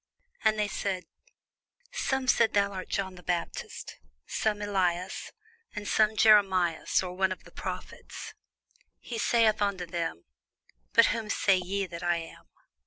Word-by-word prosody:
And 215 Hz, 0 st, +3 dB
they 210 Hz, -1 st, +1 dB
said, 190 Hz, -3 st, -3 dB, 0.9 s
Some 265 Hz, -1 st, -1 dB
say 235 Hz, -, +5 dB
that -, -, -28 dB
thou 200 Hz, -1 st, +3 dB
art 185 Hz, -2 st, -6 dB
John 190 Hz, -1 st, -2 dB
the 180 Hz, -, -12 dB
Baptist: 175 Hz, -1 st, -4 dB, 0.3 s
some, 210 Hz, -1 st, -1 dB
Elias; 185 Hz, -3 st, -1 dB, 0.4 s
and 210 Hz, -1 st, -5 dB
others, 215 Hz, 0 st, +3 dB
Jeremias, 190 Hz, -7 st, +4 dB
or 180 Hz, -1 st, -5 dB
one 190 Hz, +1 st, +1 dB
of 185 Hz, -, -5 dB
the -, -, -15 dB
prophets. -, -, -7 dB, 0.7 s
He 235 Hz, -2 st, -6 dB
saith 225 Hz, -2 st, +3 dB
unto 200 Hz, -3 st, 0 dB
them, 165 Hz, -, -3 dB, 0.7 s
But 230 Hz, -, +7 dB
whom 225 Hz, -2 st, -4 dB
say 195 Hz, -2 st, +3 dB
ye 195 Hz, +2 st, -2 dB
that 170 Hz, -2 st, -8 dB
I 175 Hz, -1 st, +2 dB
am? 165 Hz, -1 st, -9 dB
195 Hz, 150 wpm, -29 LUFS, 180-215 Hz, 0.9 s, But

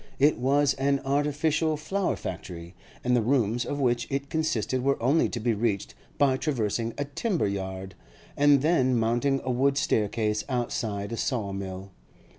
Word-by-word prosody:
It 145 Hz, 0 st, +3 dB
was 140 Hz, +2 st, +3 dB
an 140 Hz, +1 st, +2 dB
artificial 150 Hz, +3 st, +1 dB
flower 190 Hz, +6 st, -1 dB
factory, 85 Hz, 0 st, -7 dB, 0.3 s
and 125 Hz, 0 st, +2 dB
the 120 Hz, -, +3 dB
rooms 120 Hz, -1 st, +1 dB
of 145 Hz, -, -3 dB
which 120 Hz, -3 st, +1 dB
it 140 Hz, +1 st, -3 dB
consisted 130 Hz, -5 st, 0 dB
were 140 Hz, +2 st, +1 dB
only 135 Hz, +8 st, +3 dB
to 120 Hz, -, -4 dB
be 115 Hz, +1 st, +1 dB
reached 105 Hz, -2 st, -1 dB, 0.2 s
by 135 Hz, -2 st, +3 dB
traversing 115 Hz, -5 st, -1 dB
a 145 Hz, -, -1 dB
timber 165 Hz, -, -1 dB
yard, 95 Hz, -1 st, -4 dB, 0.4 s
and 145 Hz, -1 st, +4 dB
then 130 Hz, -6 st, +3 dB
mounting 120 Hz, +5 st, +1 dB
a 130 Hz, -, -1 dB
wooden 135 Hz, +3 st, +2 dB
staircase 105 Hz, -4 st, 0 dB
outside 115 Hz, -4 st, -2 dB
a 115 Hz, -, -3 dB
saw 110 Hz, -7 st, -1 dB
mill. 95 Hz, 0 st, -6 dB
125 Hz, 160 wpm, -27 LUFS, 110-140 Hz, 0.4 s, and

